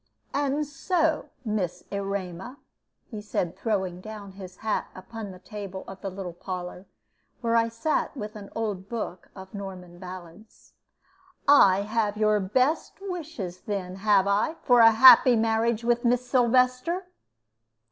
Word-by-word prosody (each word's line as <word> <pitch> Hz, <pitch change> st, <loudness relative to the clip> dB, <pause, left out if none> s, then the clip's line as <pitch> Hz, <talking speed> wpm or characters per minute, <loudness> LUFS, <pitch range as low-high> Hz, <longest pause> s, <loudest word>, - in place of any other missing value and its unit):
"And 285 Hz, +1 st, 0 dB
so, 315 Hz, +3 st, 0 dB, 0.2 s
Miss 185 Hz, -5 st, -2 dB
Erema," 200 Hz, +3 st, -4 dB, 0.5 s
he 215 Hz, -2 st, -6 dB
said, 180 Hz, -4 st, -2 dB
throwing 190 Hz, -5 st, -2 dB
down 210 Hz, -1 st, -9 dB
his 185 Hz, -1 st, -11 dB
hat 220 Hz, -, 0 dB
upon 210 Hz, +3 st, -8 dB
the 185 Hz, -, -10 dB
table 195 Hz, -1 st, -8 dB
of 195 Hz, 0 st, -10 dB
the 195 Hz, -, -3 dB
little 185 Hz, -2 st, -7 dB
parlor, 180 Hz, +1 st, -7 dB, 0.5 s
where 230 Hz, -1 st, +1 dB
I 230 Hz, 0 st, +3 dB
sat 280 Hz, +5 st, -1 dB
with 215 Hz, -1 st, -6 dB
an 205 Hz, -2 st, -9 dB
old 205 Hz, -4 st, -3 dB
book 215 Hz, -6 st, -5 dB
of 190 Hz, 0 st, -11 dB
Norman 185 Hz, -3 st, -8 dB
ballads, 185 Hz, +3 st, -12 dB, 0.7 s
"I 200 Hz, -9 st, +6 dB
have 210 Hz, 0 st, -1 dB
your 215 Hz, -1 st, +3 dB
best 255 Hz, -, 0 dB
wishes, 315 Hz, -, -6 dB
then, 190 Hz, -3 st, -4 dB
have 200 Hz, -1 st, +3 dB
I, 200 Hz, +10 st, +1 dB
for 245 Hz, -2 st, +5 dB
a 225 Hz, -1 st, +9 dB
happy 245 Hz, +2 st, +8 dB
marriage 225 Hz, +1 st, +1 dB
with 240 Hz, 0 st, +1 dB
Miss 245 Hz, +1 st, +2 dB
Sylvester?" 255 Hz, +8 st, +2 dB
210 Hz, 140 wpm, -26 LUFS, 190-240 Hz, 0.7 s, a